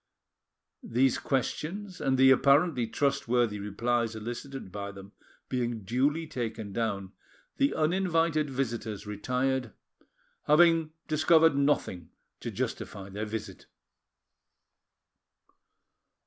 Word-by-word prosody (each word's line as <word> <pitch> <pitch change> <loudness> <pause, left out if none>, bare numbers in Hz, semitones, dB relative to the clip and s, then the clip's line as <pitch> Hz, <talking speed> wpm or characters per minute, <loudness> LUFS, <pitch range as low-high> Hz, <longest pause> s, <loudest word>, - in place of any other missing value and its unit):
These 130 +2 +1
questions 180 +8 -3
and 135 -1 +1
the 130 0 +7
apparently 140 -1 +4
trustworthy 120 -4 0
replies 115 +3 -1
elicited 120 +1 -6
by 100 +1 -5
them 100 0 -12 0.4
being 120 -4 -2
duly 140 - +1
taken 115 -8 -5
down, 100 -4 -2 0.5
the 275 +1 +2
uninvited 165 -2 +1
visitors 115 -6 -3
retired, 125 +3 -1 0.7
having 165 +1 +5 0.2
discovered 160 0 +4
nothing 140 - 0 0.3
to - - -5
justify 100 -1 -4
their 105 +2 -4
visit. 110 0 -6
125 Hz, 90 wpm, -29 LUFS, 110-150 Hz, 0.7 s, the